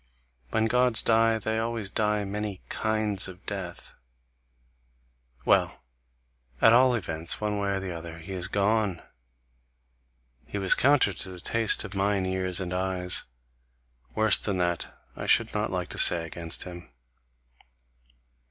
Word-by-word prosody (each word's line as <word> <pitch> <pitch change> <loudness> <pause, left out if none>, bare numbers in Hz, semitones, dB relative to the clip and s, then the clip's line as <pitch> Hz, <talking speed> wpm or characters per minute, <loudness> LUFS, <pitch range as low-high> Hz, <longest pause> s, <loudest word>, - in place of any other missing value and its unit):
When 110 +9 0
Gods 125 0 +3
die 115 0 +3
they 110 +1 -2
always 115 -3 -3
die 105 -1 0
many 100 -1 -5
kinds 110 -3 0
of 90 -1 -12
death. 95 -4 -6 1.5
Well! - - +2 0.8
At 115 - +6
all 125 +1 +5
events, 85 -6 -3
one 105 -1 -2
way 100 0 -1
or 95 -2 -5
other 85 -1 -8
he 80 +4 -11
is 90 -2 -1
gone! 100 -3 0 1.4
He - - -5
was 95 -1 +4
counter 135 -7 +3
to 95 - -8
the 90 -1 -10
taste 115 +5 +2
of 110 -2 -8
mine 100 -1 0
ears 95 -1 -1
and 90 -1 -4
eyes; 90 -1 0 0.9
worse 110 -1 +5
than 100 -3 -2
that 85 -1 -2 0.2
I - - -6
should - - +3
not - - -1
like - - -4
to - - -3
say 85 -2 +6
against 85 0 -2
him. 85 -2 -10
100 Hz, 140 wpm, -26 LUFS, 90-110 Hz, 1.5 s, At